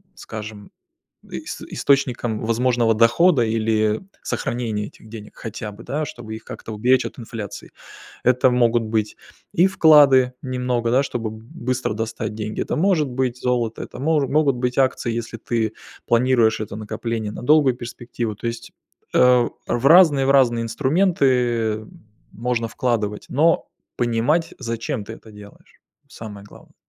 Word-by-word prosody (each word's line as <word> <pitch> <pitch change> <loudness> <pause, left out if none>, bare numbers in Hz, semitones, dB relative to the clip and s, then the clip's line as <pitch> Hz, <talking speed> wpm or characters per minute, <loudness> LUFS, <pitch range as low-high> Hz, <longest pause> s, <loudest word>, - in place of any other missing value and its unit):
скажем, 105 -2 -9 0.6
ис - - -6
источникам 125 -5 0
возможного 115 0 +2
дохода 125 +6 +4
или 110 -1 +1 0.2
сохранение 110 -4 -3
этих 110 - -18
денег 110 -1 -11
хотя 110 -1 -6
бы, 105 +3 -13
да, 150 +2 -2
чтобы 120 -5 -8
их 110 - -9
как-то 115 -2 -8
уберечь 125 +4 +2
от - - -6
инфляции. 110 -3 -8 0.5
Это 125 0 +4
могут 120 -1 +2
быть 110 -1 -2 0.3
и 175 - +4
вклады 145 -8 +6
немного, 125 -2 -1
да, 130 +3 +4
чтобы 115 -5 -3
б 110 0 -11
быстро 125 -2 -2
достать 110 0 -4
деньги. 110 0 -4
Это - - -2
может 165 -3 +2
быть 125 -1 -2
золото, 120 -3 -1
это - - -9
можу 145 +1 +1
могут 140 -2 +2
быть 125 0 -2
акции, 130 -2 +1
если 115 0 -4
ты 110 -1 -2 0.3
планируешь 120 -2 +3
это 105 -2 -5
накопление 110 0 -4
на - - -8
долгую 145 0 +4
перспективу. 120 -2 -5
То 105 - -10
есть, 115 0 -5 0.4
э, 125 -1 +5 0.2
в 120 +2 -1
разные, 155 -5 +6
в 135 - +4
разные 120 -4 +4
инструменты 125 - +1 0.4
можно 115 0 -2
вкладывать, 110 -3 -2
но 160 +5 +2 0.3
понимать, 120 +8 +1
зачем 115 0 -3
ты 110 - -8
это 110 -1 -14
делаешь- 105 -1 -16 0.3
самое 105 -3 -10
главное. - - -17
120 Hz, 145 wpm, -21 LUFS, 110-130 Hz, 0.6 s, вклады